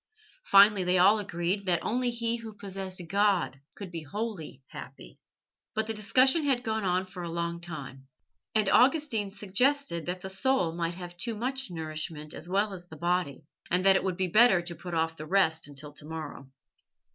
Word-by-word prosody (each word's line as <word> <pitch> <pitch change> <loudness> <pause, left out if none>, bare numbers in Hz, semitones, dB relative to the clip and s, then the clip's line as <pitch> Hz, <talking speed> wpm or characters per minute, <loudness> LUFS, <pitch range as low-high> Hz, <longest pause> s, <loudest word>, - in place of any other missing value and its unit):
Finally 200 -1 +6
they 180 +1 +2
all 200 +4 +5
agreed 190 0 -2
that 175 -2 +1
only 245 +2 0
he 235 0 -1
who 225 -2 -9
possessed 195 -2 -5
God 195 -7 +1 0.2
could 195 -4 -8
be 165 -2 -5
wholly 170 - -6
happy. - - -11 0.6
But 220 0 0
the 225 - -3
discussion 255 +9 +4
had 265 -4 +1
gone 220 -2 -1
on 185 0 +1
for 185 -1 -9
a 170 - -5
long 170 0 -3
time, 135 -6 -8 0.5
and 215 -2 +3
Augustine 250 -3 +3
suggested 205 - +1
that 180 +1 -3
the 190 - -5
soul 195 -4 +1
might 170 0 -2
have 175 -1 -8
too 230 +4 -3
much 260 +4 -2
nourishment 155 -2 -4
as 170 - -7
well 200 +2 +1
as 175 -2 -10
the 160 - -11
body, 175 -3 -1 0.3
and 180 +2 +1
that 195 0 +7
it 190 - +1
would 185 -2 -2
be 190 -1 0
better 215 +1 +6
to 175 0 -4
put 175 0 -7
off 165 0 0
the 155 - -7
rest 165 -4 +2
until 145 +1 -10
to 150 - -11
morrow. 155 -4 -7
185 Hz, 190 wpm, -28 LUFS, 170-215 Hz, 0.6 s, that